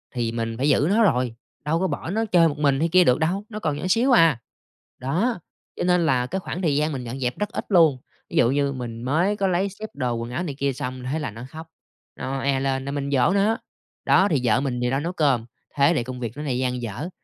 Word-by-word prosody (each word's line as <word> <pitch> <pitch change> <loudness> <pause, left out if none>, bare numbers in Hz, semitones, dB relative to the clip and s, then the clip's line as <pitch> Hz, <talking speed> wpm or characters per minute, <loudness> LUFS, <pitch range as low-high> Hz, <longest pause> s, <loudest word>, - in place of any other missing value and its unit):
thì 115 -2 -1
mình 115 -1 -3
phải 140 +4 +1
giữ 145 - +3
nó 220 +4 +4
rồi, 125 - +1 0.3
đâu 160 +2 +1
có 190 - +1
bỏ 165 - -4
nó 220 +3 0
chơi 175 -5 +4
một 145 - -5
mình 140 -2 +2
hay 165 +2 +1
kia 180 +2 +6
được 125 -4 +3
đâu, 180 +6 -1
nó 215 -1 -6
còn 155 -7 -1
nhỏ 150 - -5
xíu 235 +7 +3
à. 165 - +5 0.6
Đó, 180 - 0 0.4
cho - - -2
nên 180 -1 +3
là 125 -5 +2
cái 190 +8 -3
khoảng 185 0 -5
thời 155 -6 +1
gian 150 +1 +1
mình 130 -4 -4
dọn 125 +3 -6
dẹp 125 -1 -2
rất 210 -1 -1
ít - - -5
luôn. 165 -8 +5 0.3
Ví - - -4
dụ 120 - +4
như 140 0 +1
mình 120 -3 -6
mới 170 +11 +1
có 195 - +1
lấy 185 +2 +1
xếp 205 +3 -8
đồ 125 -3 -2
quần 115 0 -4
áo 130 - -2
này 150 -6 -4
kia 140 0 0
xong 130 0 -5
thế 155 - -1
là 145 -8 -4
nó 115 +3 -9
khóc, 160 +2 -9 0.5
nó 135 +1 -3
oe 135 0 +1
lên 135 0 -1
là 140 - -3
mình 140 0 -3
dỗ 130 +3 +3
nó, 205 +3 +2 0.5
đ,ó 190 - +5
thì 145 -6 +1
vợ 115 0 +3
mình 125 -3 -2
thì 125 - +1
đang 135 +3 -1
nấu 175 +2 -3
cơm. 140 -9 +1 0.3
Thế 140 +4 +5
thì 120 - 0
công 125 +1 -7
việc 120 +1 -5
nó 150 - -4
lại 130 -4 -1
dang 125 -1 -1
dở, 120 - -5
140 Hz, 270 wpm, -23 LUFS, 125-175 Hz, 0.6 s, kia